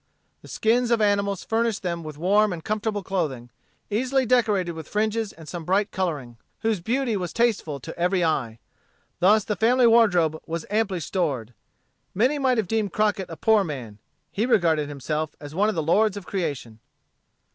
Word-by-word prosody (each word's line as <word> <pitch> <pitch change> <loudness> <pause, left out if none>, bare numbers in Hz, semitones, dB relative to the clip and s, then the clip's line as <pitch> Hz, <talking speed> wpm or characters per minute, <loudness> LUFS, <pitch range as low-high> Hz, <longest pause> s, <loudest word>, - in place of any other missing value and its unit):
The - - -14
skins 235 +2 +1
of 235 -1 +3
animals 200 -2 +1
furnished 225 -2 -1
them 170 -2 -3
with 155 -2 -8
warm 205 +5 +3
and 170 -3 -6
comfortable 215 -1 -2
clothing, 145 -11 -3 0.4
easily 260 +5 +1
decorated 215 -7 +2
with 160 -2 -8
fringes 215 0 -1
and 160 -2 -14
some 175 0 -6
bright 195 +4 +1
coloring, 145 -11 -3 0.2
whose 225 -3 0
beauty 235 +5 -1
was 180 -4 -3
tasteful 210 -11 0
to - - -8
every 180 +1 +2
eye. 130 -9 -1 0.6
Thus 205 +4 +5
the 210 - -2
family 245 +4 +3
wardrobe 180 -9 +4
was 165 0 -4
amply 210 -5 0
stored. 140 - -2 0.6
Many 255 +9 +2
might 260 -2 +2
have 215 -4 0
deemed 215 -2 -1
Crockett 210 -3 0
a 165 - -8
poor 220 -2 +4
man. 125 - -7 0.3
He 220 +4 -1
regarded 160 - +2
himself 150 +2 -3
as 145 0 -9
one 205 +5 +2
of 220 - -2
the 160 - -1
lords 205 +6 +2
of 200 - -8
creation. 145 - -4
195 Hz, 175 wpm, -24 LUFS, 160-220 Hz, 0.6 s, Thus